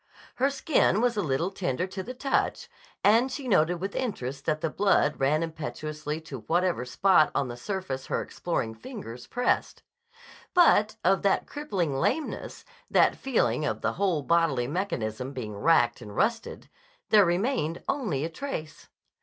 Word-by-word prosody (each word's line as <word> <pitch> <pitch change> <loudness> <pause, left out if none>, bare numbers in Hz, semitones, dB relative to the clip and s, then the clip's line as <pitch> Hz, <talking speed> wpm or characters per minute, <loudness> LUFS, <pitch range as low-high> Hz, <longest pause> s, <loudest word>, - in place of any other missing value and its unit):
Her 270 +2 +3
skin 275 -6 +2
was 240 0 +2
a 205 - 0
little 165 +3 -1
tender 175 -4 -2
to 190 0 -6
the 250 +6 -7
touch, 275 - -1 0.4
and 230 +6 +4
she 270 0 -5
noted 175 -5 +3
with 195 +3 -5
interest 140 - -3
that 155 -1 0
the 165 - 0
blood 195 -7 +2
ran 150 +4 +2
impetuously 155 -1 -5
to 145 -5 -8
whatever 175 -8 +1
spot 155 +4 +4
on 135 - 0
the 120 - -5
surface 135 -2 -4
her - - 0
exploring 120 -10 -3
fingers 125 - -9
pressed. 245 0 -1 0.7
But 215 -12 +5
of 190 +2 +3
that 200 - +2
crippling 195 - -2
lameness, 300 - -2 0.2
that - - +4
feeling 155 - 0
of - - -2
the - - 0
whole 180 -6 0
bodily 165 -6 +2
mechanism 130 - -3
being 110 -6 -5
racked 120 0 +3
and 105 -3 -9
rusted, 225 0 -1 0.4
there 210 -1 +7
remained 175 - 0
only 195 - -1
a - - -3
trace. 165 - -6
170 Hz, 155 wpm, -27 LUFS, 140-215 Hz, 0.7 s, there